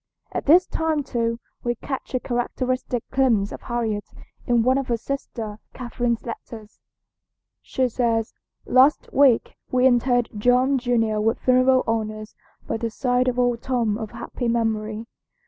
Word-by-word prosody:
At - - -4
this 350 +5 +7
time 320 -4 -1
too 230 -3 -2 0.2
we 240 0 0
catch 265 +2 -5
a - - +2
characteristic 250 0 -2
glimpse 230 -7 +2
of - - -8
Harriet 225 -4 -3 0.4
in 240 -2 +3
one 260 +3 +3
of 270 - -4
her 235 - 0
sister 225 -4 -5 0.2
Catherine's 240 -1 -2
letters. 225 -2 -9 0.8
She 260 -1 0
says: 230 -2 0 0.3
"Last 260 +4 +3
week 270 -4 +3
we 255 0 +2
interred 245 -1 +3
Tom 255 +3 +3
junior 225 -4 +1
with 225 +2 +1
funeral 255 0 +3
honors 215 -1 -3 0.3
by - - -2
the 230 +1 -2
side 250 +2 0
of 250 -1 0
old 245 -2 +1
Tom 235 -5 0
of 220 -2 -5
happy 245 - -5
memory. 220 -1 -1
240 Hz, 145 wpm, -23 LUFS, 225-255 Hz, 0.8 s, this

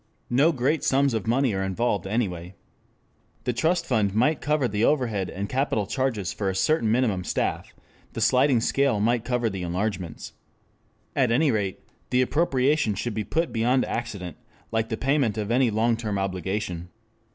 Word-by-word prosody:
No 140 +7 +4
great 140 +2 0
sums 135 -1 +2
of 110 -2 -2
money 125 0 +2
are 95 - -1
involved 95 0 -1
anyway. 95 -4 -2 0.9
The 125 - -1
trust 160 +9 +1
fund 105 -5 +1
might 140 +7 +2
cover 150 -3 +1
the 105 0 -1
overhead 115 -10 +1
and 100 +2 -4
capital 130 -4 0
charges 115 -4 -1
for 100 -2 -2
a 95 - -3
certain 115 +2 +2
minimum 110 -6 +1
staff, - - -2 0.4
the - - -5
sliding 130 -2 +3
scale 135 -2 +1
might 115 +2 +1
cover 125 -1 0
the 95 -3 -4
enlargements. 90 0 -3 0.8
At 130 -3 +3
any 140 +5 +3
rate 100 -4 -2 0.3
the 125 0 +3
appropriation 135 -5 +1
should 115 +3 -3
be 110 - -2
put 160 - -1
beyond 125 +3 +2
accident, 100 -7 -5 0.3
like 110 0 0
the 110 - -2
payment 135 -5 +1
of 105 +1 -2
any 125 0 +3
long 115 +2 +2
term 110 -3 -3
obligation. 95 -2 -3
115 Hz, 165 wpm, -25 LUFS, 100-130 Hz, 0.9 s, No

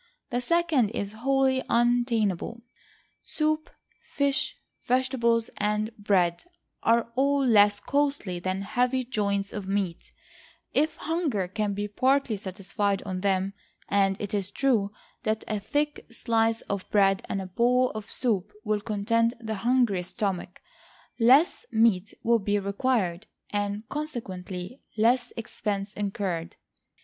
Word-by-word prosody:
The 245 0 0
second 320 -5 +2
is 200 -2 -3
wholly 265 +3 +1
untenable; 235 -3 +1 0.6
soup, 310 0 -1 0.3
fish, 280 -1 -1 0.3
vegetables, 245 -3 +1
and 210 +2 -1
bread, 185 -5 +1 0.4
are 230 0 +2
all 280 +1 +2
less 205 -3 +5
costly 280 -9 0
than 185 +2 -2
heavy 250 +5 +1
joints 200 -4 -1
of 200 -3 -5
meat; 195 -4 -2 0.6
if 310 +2 +2
hunger 300 - -1
can 205 +1 -2
be 205 +1 -2
partly 260 +3 +2
satisfied 195 +1 -2
on 185 -2 -4
them, 195 0 +1 0.4
and 195 -1 +2
it 205 -1 -4
is 200 -2 -1
true 220 -4 +1 0.3
that 220 -2 -1
a 215 - -1
thick 295 +8 -2
slice 225 -1 +1
of 200 -2 -4
bread 195 -2 +4
and 195 - -1
a 190 - -4
bowl 245 +7 +2
of 215 -1 -7
soup 210 -5 0
will 210 -2 0
content 230 +3 +1
the 220 -2 -4
hungriest 235 -7 +1
stomach, 195 -5 -3 0.6
less 260 +8 +5
meat 220 -3 +3
will 230 0 +4
be 205 0 0
required, 200 -2 0 0.2
and 205 +1 -2
consequently 205 -7 -5 0.2
less 240 +3 +3
expense 210 -3 -3
incurred. 195 -4 -3
215 Hz, 125 wpm, -27 LUFS, 200-250 Hz, 0.6 s, less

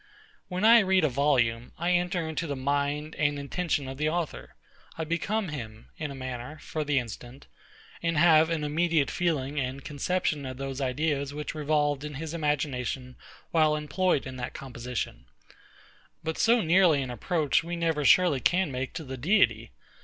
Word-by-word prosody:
When 185 +3 -1
I 230 +1 +9
read 190 -3 +3
a 155 - +3
volume, 125 -4 +1
I 170 +2 0
enter 180 -1 +1
into 160 +1 -3
the 145 - -2
mind 145 +3 -1
and 145 -1 +2
intention 145 0 -2
of 135 0 -6
the 155 0 +2
author: 165 -2 -4 0.4
I 165 - -2
become 180 +5 -1
him, 115 -7 -8
in 155 -2 -4
a 140 - -7
manner, 130 +2 -6
for 155 0 -4
the 145 -1 0
instant; 120 +2 -5 0.6
and 165 -2 0
have 160 0 +6
an 165 -2 -1
immediate 155 -1 +1
feeling 150 -4 -1
and 130 +1 -4
conception 155 0 -1
of 130 -1 -6
those 135 0 -4
ideas 140 +1 -1
which 150 0 -4
revolved 145 -2 0
in 150 -1 -6
his 160 +3 -5
imagination 135 -5 -2 0.4
while 155 -2 +4
employed 150 +2 0
in 130 -1 -7
that 120 0 -5
composition. 120 - -5 1.0
But 160 0 -3
so 235 +1 +4
near 180 +1 +5
an 135 -3 -2
approach 155 +3 +1
we 170 +1 -4
never 165 -3 0
surely 170 -1 +5
can 175 +3 +2
make 130 +1 -4
to 165 - -5
the 130 -2 -7
Deity. 195 - +2
150 Hz, 170 wpm, -28 LUFS, 135-165 Hz, 1.0 s, I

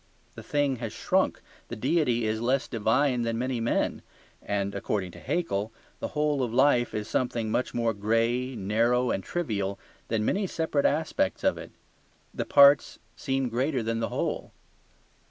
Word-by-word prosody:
The - - -9
thing 145 -3 0
has 115 -2 -5
shrunk. - - 0 0.3
The - - -6
deity 125 -2 +1
is 110 +1 -1
less 130 +3 +1
divine 125 +3 +1
than 115 -1 -1
many 125 0 -1
men; 115 - 0 0.4
and 100 -1 -2
(according 100 -2 -2
to - - -12
Haeckel) 110 - -2 0.3
the - - -3
whole 150 -2 +1
of 120 -3 -1
life 125 -1 +3
is 105 -1 -3
something 115 -3 -1
much 125 +3 -1
more 115 -1 +1
grey, 115 +5 0
narrow, 115 +5 +1
and 95 - -2
trivial 100 - -2 0.3
than 110 -2 0
many 195 - 0
separate 160 -4 +1
aspects 155 +2 -1
of - - +2
it. - - -9 0.6
The - - -3
parts 140 0 +6 0.2
seem 135 -2 -1
greater 125 +2 -1
than 115 +1 -1
the 115 - -1
whole. - - -3
120 Hz, 160 wpm, -27 LUFS, 110-135 Hz, 0.6 s, parts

